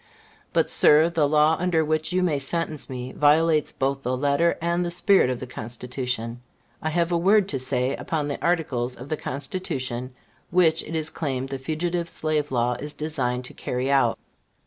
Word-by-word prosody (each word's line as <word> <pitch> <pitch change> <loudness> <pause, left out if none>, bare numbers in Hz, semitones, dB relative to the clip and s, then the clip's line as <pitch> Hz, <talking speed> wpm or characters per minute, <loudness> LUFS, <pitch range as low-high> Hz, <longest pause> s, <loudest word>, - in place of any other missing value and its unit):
But, - - +2
sir, 155 +3 +5
the 155 -4 +2
law 155 +1 +4
under 170 -3 +1
which 155 +1 -1
you 185 0 +1
may 155 -6 +1
sentence 155 +2 -2
me 125 0 -5
violates 150 +1 +3
both 135 +1 -1
the 125 0 -1
letter 145 +5 +2
and 170 +1 0
the 175 - -2
spirit 180 -3 +3
of 125 -2 -2
the - - -5
Constitution. 120 0 -5 0.4
I 155 - -1
have 170 +2 0
a 170 - +2
word 195 +3 +4
to 135 - -2
say 130 +1 0
upon 155 -3 -2
the 145 - -5
articles 130 -8 0
of 125 +4 -10
the 155 - 0
Constitution 130 -4 -4 0.3
which 170 -2 +3
it 165 - -7
is 155 -1 0
claimed 135 -4 -3
the 135 -1 -4
Fugitive 170 +4 -2
Slave 155 -3 -1
Law 120 -1 +1
is 150 0 -5
designed 130 -5 -2
to - - -9
carry 125 +2 -2
out. 135 -4 +3
150 Hz, 185 wpm, -24 LUFS, 130-165 Hz, 0.4 s, sir